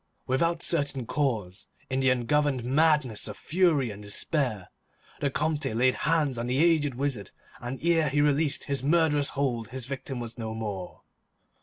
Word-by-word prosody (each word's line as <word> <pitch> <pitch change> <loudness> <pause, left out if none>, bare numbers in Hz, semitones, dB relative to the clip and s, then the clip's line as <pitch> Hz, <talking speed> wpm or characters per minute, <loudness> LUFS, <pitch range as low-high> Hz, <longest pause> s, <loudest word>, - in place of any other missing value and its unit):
Without 165 +6 0
certain 145 -6 +1
cause, 115 -8 -2 0.2
in 130 0 -1
the 130 0 +3
ungoverned 130 +1 +1
madness 140 -4 +2
of 105 - -7
fury 155 - +2
and 100 0 -9
despair, 105 - -2 0.5
the 145 - +1
Comte 150 +1 -1
laid 130 +2 +3
hands 150 -5 0
on 120 - -3
the 125 +1 0
aged 155 -4 +3
wizard, 130 -7 -2 0.3
and 125 +2 -5
ere 165 -3 +3
he 145 +2 0
released 145 0 +2
his 140 -1 -1
murderous 150 -2 +2
hold 120 -5 0
his 130 0 -4
victim 135 -1 -5
was 120 0 -7
no 110 -1 -4
more. 100 -5 -6
135 Hz, 160 wpm, -27 LUFS, 120-150 Hz, 0.5 s, the